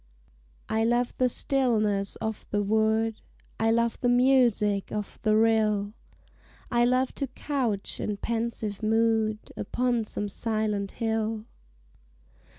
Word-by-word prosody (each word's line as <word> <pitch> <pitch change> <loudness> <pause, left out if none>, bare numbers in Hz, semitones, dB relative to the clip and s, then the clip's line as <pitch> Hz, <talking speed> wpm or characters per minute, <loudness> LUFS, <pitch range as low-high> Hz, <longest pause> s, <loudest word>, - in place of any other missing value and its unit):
I 220 0 0
love 240 +1 +1
the 255 -1 +3
stillness 215 -7 +1
of 220 -1 -5
the 205 0 0
wood: 220 +1 +1 0.4
I 225 - +2
love 235 0 +1
the 245 - +2
music 245 -5 +3
of 210 -1 -5
the 215 -1 +3
rill: 215 -2 +2 0.8
I 240 0 +3
love 255 +1 +1
to 275 - -3
couch 250 -6 -2
in 210 -1 -2
pensive 225 -2 -2
mood 220 -1 +1
Upon 245 +1 0
some 210 0 -4
silent 210 -1 -2
hill. 225 -1 -2
225 Hz, 120 wpm, -27 LUFS, 210-240 Hz, 0.8 s, the